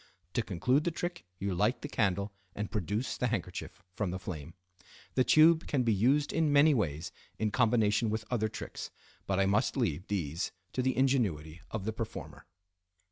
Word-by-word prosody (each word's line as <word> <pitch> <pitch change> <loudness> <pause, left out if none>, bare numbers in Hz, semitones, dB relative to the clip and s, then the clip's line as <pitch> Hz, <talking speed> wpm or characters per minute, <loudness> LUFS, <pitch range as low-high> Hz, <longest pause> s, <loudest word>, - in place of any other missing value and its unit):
To 120 - +2
conclude 125 - +1
the 170 - +1
trick 175 - -4
you 100 0 -2
light 105 +8 +1
the - - -2
candle 100 -6 0 0.2
and 105 0 -4
produce 110 +3 -2
the 125 - +1
handkerchief 110 -4 -4
from 100 -1 -1
the 90 - -3
flame. 85 -3 -7 0.6
The 130 - +4
tube 160 +4 +5
can 135 -4 +1
be 115 -2 +3
used 135 +9 +2
in 160 -2 +2
many 145 +2 +6
ways 80 - -1 0.3
in 110 -1 0
combination 110 -2 +3
with 110 0 -2
other 110 -3 +1
tricks, - - -6 0.4
but 95 0 +1
I 95 - +4
must 100 +6 +1
leave 90 - -1
these 85 -3 -2 0.2
to 130 - 0
the 130 -1 0
ingenuity 100 - +1
of 105 -3 -4
the 110 - -1
performer. 115 0 -7
110 Hz, 180 wpm, -31 LUFS, 95-130 Hz, 0.6 s, many